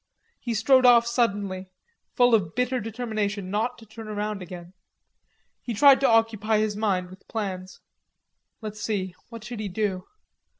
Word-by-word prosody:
He 235 -2 -3
strode 260 +4 +4
off 235 -1 +7
suddenly, 200 -6 -1 0.5
full 245 -1 +4
of 190 -6 +2
bitter 250 +1 0
determination 215 -4 -3
not 225 +4 -1
to 225 - -14
turn 220 +1 -10
round 210 -1 -3
again. 175 -1 -9 0.9
He 235 - -4
tried 275 +4 +7
to 275 - +3
occupy 225 -1 +2
his 215 -1 0
mind 190 -4 -1
with 185 - -15
plans. 190 -4 -5 0.8
Let's 215 0 -7
see, 190 -5 -2 0.2
what 230 -2 -9
should 235 0 -7
he 210 -2 -3
do? 190 -1 -2
215 Hz, 155 wpm, -25 LUFS, 195-230 Hz, 0.9 s, off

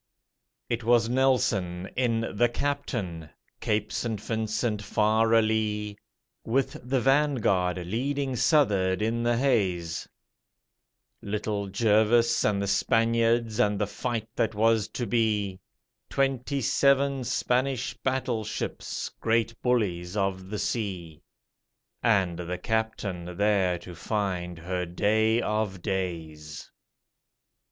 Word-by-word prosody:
_ - - -59 0.6
It 120 0 -2
was 115 0 +3
Nelson 105 -9 +1
in 120 -3 +1
the 120 +3 +3
'Captain', 115 - -3 0.3
Cape 105 -1 -1
St. 110 0 -2
Vincent 110 0 -2
far 110 +2 +2
alee, 110 -2 +1 0.5
With 130 +3 -1
the 130 +2 0
'Vanguard' 120 -10 +2
leading 135 +7 -1
s'uth'ard 105 - +2
in 115 +2 0
the 120 0 +1
haze 95 - 0 1.1
Little 105 0 -3
Jervis 115 +3 +3
and 105 -2 +2
the - - -2
Spaniards 115 +2 +2
and 105 0 +3
the 105 - +1
fight 110 +2 -3
that 110 -1 0
was 110 0 +3
to 120 - -4
be, 105 -4 0 0.5
Twenty 135 0 0
seven 140 +1 +2
Spanish 125 +1 0
battleships, 125 -5 -3
great 115 0 +1
bullies 100 -7 0
of 95 -1 -1
the 105 - -3
sea, 90 -9 -3 0.8
And 95 -7 +2
the 90 +1 -4
'Captain' 100 -6 -3
there 100 -3 +2
to 85 +1 -10
find 90 -2 -3
her 90 +1 -3
day 110 +6 +2
of 105 -4 -2
days. 80 -6 -4
110 Hz, 110 wpm, -27 LUFS, 95-120 Hz, 1.1 s, was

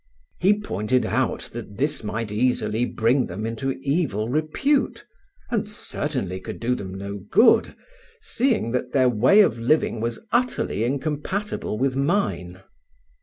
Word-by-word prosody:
He 205 +4 +3
pointed 125 - 0
out - - -1
that 100 - -8
this 145 +2 -1
might 110 0 -3
easily 120 0 +1
bring 125 +3 +1
them 100 +5 -5
into 115 +4 -2
evil 135 - 0
repute, 155 - 0 0.5
and 215 -3 -1
certainly 130 - -3
could - - -7
do 120 +2 0
them 95 -6 -5
no 100 +1 -5
good, 240 - +5 0.4
seeing 235 - 0
that 125 0 -2
their 130 -2 +4
way 125 - +5
of 120 - +2
living 115 -2 +1
was 115 - -3
utterly 245 - 0
incompatible 150 - -2
with 130 +1 0
mine. 135 - -1
125 Hz, 135 wpm, -24 LUFS, 110-155 Hz, 0.5 s, good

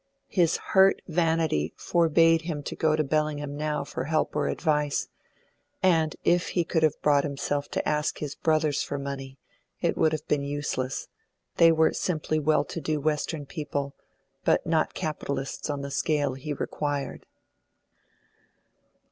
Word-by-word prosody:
His 170 -4 +2 0.2
hurt 195 -1 +5
vanity 160 - +1
forbade 165 -1 +3
him 160 -3 -4
to - - -5
go 155 -1 +2
to 155 - +1
Bellingham 145 -1 -1
now 150 -1 -1
for 130 -2 -5
help 155 +1 0
or - - +1
advice; 150 -3 0 0.7
and 165 -4 +3
if 175 0 +3
he 175 - +4
could 160 0 0
have 155 -2 +2
brought 145 -1 +4
himself 145 0 -2
to - - -2
ask 150 0 0
his 145 -2 -4
brothers 155 -2 +1
for 145 - -3
money, 135 -1 -6 0.4
it - - +1
would 155 - +3
have 155 -1 -4
been 150 -1 +1
useless; 140 -2 -3 0.5
they 165 0 +7
were 160 0 +3
simply 155 -3 -1
well 155 -1 +3
to 165 - -6
do 155 +1 -1
Western 150 0 -1
people, 145 -2 -4 0.5
but - - +2
not 160 -1 +1
capitalists 140 -3 -3
on 145 -1 -2
the 140 0 -5
scale 145 -1 +1
he 135 +3 -6
required. 145 -1 -3
150 Hz, 150 wpm, -27 LUFS, 145-160 Hz, 0.7 s, they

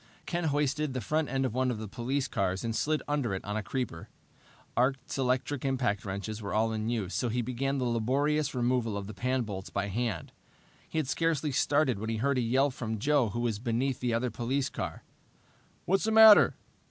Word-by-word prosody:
Ken 175 -1 -2
hoisted 145 -1 0
the - - 0
front 155 +5 -1
end 135 +1 0
of 125 - -2
one 130 +1 +1
of 120 - -2
the 110 0 -6
police 130 +6 -2
cars 95 -6 -1
and 115 -1 -2
slid 155 +4 0
under 140 -9 0
it 95 - -6
on 105 - -3
a 110 - 0
creeper. 105 -6 -4 0.7
Art's 130 +1 0
electric 130 +1 0
impact 125 -7 0
wrenches 100 +3 -4
were 100 0 -4
all 110 +1 +2
in 110 0 -2
use, 105 -6 -2
so 125 - 0
he 120 +2 -1
began 135 +3 -1
the 130 - -1
laborious 135 +5 +1
removal 120 -3 0
of 100 - -4
the 110 - -7
pan 130 +2 0
bolts 95 -3 -6
by 100 0 -2
hand. 105 -5 -2 0.6
He - - -5
had 155 -4 0
scarcely 155 0 0
started 135 -3 +2
when 110 +2 -4
he 115 - -1
heard 135 +3 +1
a - - +2
yell 130 +4 +2
from 110 -3 -4
Joe 140 0 +2
who 120 +4 -3
was 115 -4 -1
beneath 125 +3 -1
the 125 -1 -1
other 115 +1 0
police 130 +5 -1
car. - - -5 0.8
"What's 195 +3 +2
the 220 - +1
matter?" 220 -1 +8
125 Hz, 210 wpm, -30 LUFS, 110-140 Hz, 0.8 s, matter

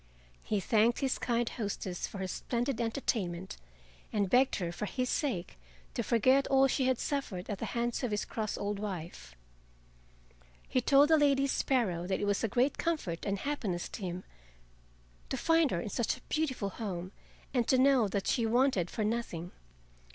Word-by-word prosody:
He 210 - 0
thanked 225 +5 +2
his 270 -1 0
kind 240 -1 0
hostess 200 -6 -3
for - - -8
her 190 -1 -3
splendid 240 +5 -2
entertainment, 195 -7 -2 0.5
and 200 -3 0
begged 260 +2 +4
her 175 -3 -2
for 175 +4 -4
his 255 +2 -1
sake 205 - -2 0.3
to - - -1
forget 260 +4 +3
all 270 0 +5
she 265 0 +1
had 260 -2 +2
suffered 230 -12 -3
at 200 - -4
the - - -3
hands 235 0 0
of 250 - -1
his 210 -1 -1
cross 215 -2 -3
old 205 0 -2
wife. 170 - -6 1.3
He 255 - +1
told 280 +4 +5
the 315 - +6
Lady 275 -2 +4
Sparrow 225 -11 0
that 190 - 0
it - - -1
was 205 +1 0
a - - +3
great 250 +6 +1
comfort 255 - -2
and 200 0 0
happiness 205 -9 -2
to - - -8
him 180 -1 -4 1.1
to - - -2
find 325 -2 +3
her 175 - -1
in 205 - -4
such 235 +5 -1
a - - -17
beautiful 265 -10 -1
home 185 -4 -5 0.4
and 245 -3 +1
to 260 - +4
know 260 -4 +5
that 195 0 -2
she 240 - +1
wanted 235 -7 +2
for 215 - -2
nothing. 210 -6 -2
225 Hz, 180 wpm, -31 LUFS, 190-260 Hz, 1.3 s, the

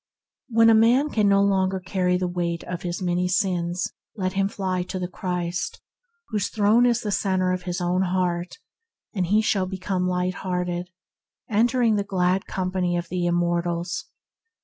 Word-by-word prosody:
When 225 -1 +5
a - - +6
man 240 +7 +4
can 210 -2 +3
no 200 0 +4
longer 190 -1 +1
carry 180 -1 0
the 180 0 -1
weight 175 -1 -2
of 175 -1 -5
his 175 +1 -4
many 180 0 +1
sins, 180 -2 0 0.2
let 185 -3 -2
him 195 0 +1
fly 185 -3 -2
to 185 +1 -5
the 180 -1 -2
Christ, 180 -2 -3 0.5
whose 210 -3 0
throne 220 +3 +4
is 240 -1 +2
the 210 - -3
centre 185 -2 +1
of 180 -1 -3
his 175 - -2
own 180 +1 +1
being; 180 -2 0 0.7
and 185 -5 -1
he 210 +4 +3
shall 195 -3 +1
become 185 -1 -2
light 180 0 0
hearted, 180 -1 -3 0.6
entering 230 +1 +3
the 200 - 0
glad 185 -1 0
company 185 -1 -1
of 175 0 -4
the 180 0 -1
im 175 - +1
mortals. 175 +2 -1
185 Hz, 170 wpm, -24 LUFS, 180-200 Hz, 0.7 s, a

